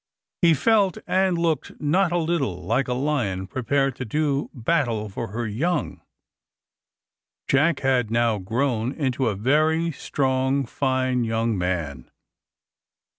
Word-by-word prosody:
He 170 -3 +5
felt 200 +3 +2
and 190 -2 +1
looked 165 -2 -1
not 175 +5 +2
a 175 - +1
little 150 - -1
like 130 +9 0
a 125 - -1
lion 125 -9 -1
prepared 135 +4 0
to - - -4
do 145 +3 -1
battle 120 -5 -1
for 115 +4 -5
her 115 +4 -4
young. 145 +12 -2 1.5
Jack 145 +3 +2
had 130 -4 +1
now 115 -2 +1
grown 115 +4 -1
into 130 -4 -1
a 105 - 0
very 155 +9 +2
strong 135 -1 0
fine 130 -1 0
young 115 0 0
man. 85 -8 -3
130 Hz, 125 wpm, -24 LUFS, 115-155 Hz, 1.5 s, He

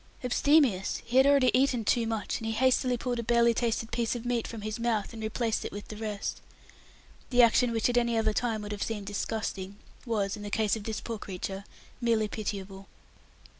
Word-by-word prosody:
Abstemious! 250 -6 +3
He 240 +2 0
had 265 +1 +7
already 275 -3 +5
eaten 250 -3 +2
too 230 +1 +2
much, 220 -3 -2
and 225 - -5
he 225 - -1
hastily 255 +1 +2
pulled 245 0 -2
a - - -2
barely 235 0 +4
tasted 230 -1 -1
piece 235 0 0
of 240 0 -6
meat 240 -2 0
from 225 -2 -7
his 215 +2 -4
mouth, 230 -2 -1
and 225 - -7
replaced 220 +1 -1
it - - -5
with 205 0 -8
the 215 - -6
rest. 210 -1 -4 0.9
The 245 -1 +6
action 235 +1 +4
which 225 -1 +1
at 245 0 +1
any 235 -1 0
other 220 -1 +2
time 225 -2 -1
would 205 - -6
have 205 -1 -5
seemed 210 -3 -3
disgusting, 200 -1 -3 0.3
was, 205 -3 0
in 210 - -9
the 205 - -5
case 215 0 +1
of 215 -2 -7
this 220 -1 -3
poor 230 -2 -5
creature, 195 +1 -5 0.4
merely 225 -2 +2
pitiable. 195 -2 -5
225 Hz, 205 wpm, -29 LUFS, 210-240 Hz, 0.9 s, had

